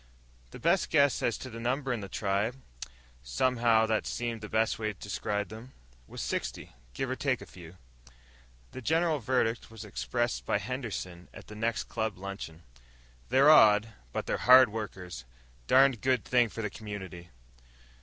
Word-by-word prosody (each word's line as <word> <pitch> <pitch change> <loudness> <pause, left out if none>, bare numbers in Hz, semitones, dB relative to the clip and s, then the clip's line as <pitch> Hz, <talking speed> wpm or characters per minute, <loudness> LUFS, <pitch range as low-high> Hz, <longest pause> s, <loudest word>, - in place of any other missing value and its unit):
The - - -10
best 170 +3 +2
guess 140 -3 +3
as 120 - 0
to 130 - -8
the 115 - -7
number 130 +2 -1
in 120 - -3
the 100 -2 -7
tribe 100 +4 -1 0.7
(somehow, 115 - +2
that 110 -1 0
seemed 115 -2 -3
the 105 - -7
best 110 0 +1
way 110 -1 -2
to - - -26
describe 105 0 -3
them) 110 +4 -11 0.3
was - - -7
sixty, - - -4 0.2
give 135 - -2
or - - -1
take 130 -2 0
a - - -10
few. 90 -1 -13 0.9
The 130 - -8
general 160 +3 +1
verdict 115 -1 0
was 110 -1 -10
expressed - - -2
by - - +1
Henderson 100 -9 -5
at - - -11
the 105 - -11
next 115 +1 -1
club 110 -3 -3
luncheon. 95 -4 -7 0.7
"They're 135 +4 +6
odd, 110 -6 +6 0.2
but - - -3
they're - - -1
hard 130 -1 +8
workers. 95 - -6 0.4
Darned 135 -3 +5
good 130 -3 +1
thing 120 -2 +3
for 115 - -6
the 105 - -3
community." 95 -5 -8
110 Hz, 165 wpm, -29 LUFS, 100-125 Hz, 0.9 s, hard